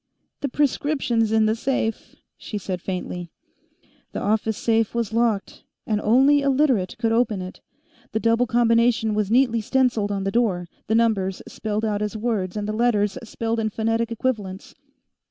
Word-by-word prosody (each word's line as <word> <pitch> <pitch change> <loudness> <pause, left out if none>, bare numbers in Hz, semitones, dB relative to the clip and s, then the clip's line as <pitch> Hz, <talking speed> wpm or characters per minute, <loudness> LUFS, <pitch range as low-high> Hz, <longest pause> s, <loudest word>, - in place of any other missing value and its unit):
"The 280 - -2
prescription's 265 -5 0
in 220 0 +4
the 215 +1 +2
safe," 230 -2 -2 0.2
she 210 - -6
said 185 -3 -4
faintly. 180 -2 -5 0.8
The - - -3
office 220 +1 0
safe 225 -1 +1
was 230 -2 -1
locked, 225 -4 0 0.2
and 210 -2 0
only 270 +6 +4
a 280 - +1
Literate 260 -9 +1
could 225 0 0
open 225 -3 +1
it. 185 0 -8 0.5
The 220 - 0
double 230 +2 +2
combination 230 -1 +3
was 210 -2 0
neatly 235 -1 +3
stenciled 235 -3 +1
on 195 -1 -2
the 195 - -1
door, 195 -7 +1 0.2
the 220 - +1
numbers 205 -5 +1
spelled 215 0 -3
out 210 -1 -1
as 210 +1 -2
words 215 -4 -2
and 205 0 -3
the 215 - -2
letters 215 -1 +1
spelled 230 0 -3
in 220 -1 0
phonetic 225 +2 -1
equivalents. 210 -5 -3
225 Hz, 165 wpm, -23 LUFS, 205-235 Hz, 0.8 s, in